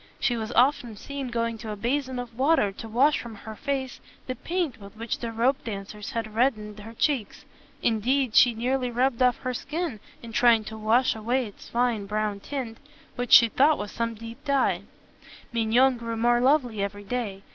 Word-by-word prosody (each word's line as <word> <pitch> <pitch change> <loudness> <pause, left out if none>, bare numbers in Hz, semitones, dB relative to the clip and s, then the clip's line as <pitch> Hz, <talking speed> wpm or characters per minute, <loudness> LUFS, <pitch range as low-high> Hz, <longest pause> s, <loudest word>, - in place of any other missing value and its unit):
She 245 - +1
was 220 0 -4
often 245 -2 +2
seen 275 +5 -6
going 230 -2 -2
to 220 -1 -7
a 210 - -3
basin 260 +4 -1
of 245 -2 -6
water 265 -5 +3
to 225 +3 -9
wash 270 +7 +3
from 235 -2 -8
her 220 +2 -9
face 270 0 -3 0.3
the 255 - -3
paint 290 - -3
with 200 +2 -12
which 230 0 -3
the 235 - -4
ropedancers 220 -4 -2
had 225 -2 -3
red 250 +3 +3
dened 210 0 -10
her 225 +2 -10
cheeks: 265 -4 -1 0.4
indeed, 240 +2 +1
she 240 0 +6
nearly 250 +2 0
rubbed 245 +1 0
off 250 +1 +3
the 255 -1 -1
skin 300 -1 -4 0.2
in 230 - -8
trying 230 -1 +4
to 220 - -8
wash 220 +4 +2
away 240 +4 0
its 205 - -12
fine 235 -4 0
brown 210 -1 -1
tint, 240 -1 -5 0.4
which 245 -1 -4
she 235 - +9
thought 285 +7 +3
was 205 - -5
some 230 0 -2
deep 230 +4 -10
dye. 280 -2 +1 0.7
Mignon 240 +3 +3
grew 230 -1 -4
more 240 +1 +3
lovely 250 -6 +2
every 205 +1 -4
day. 200 -3 -4
235 Hz, 190 wpm, -26 LUFS, 220-260 Hz, 0.7 s, she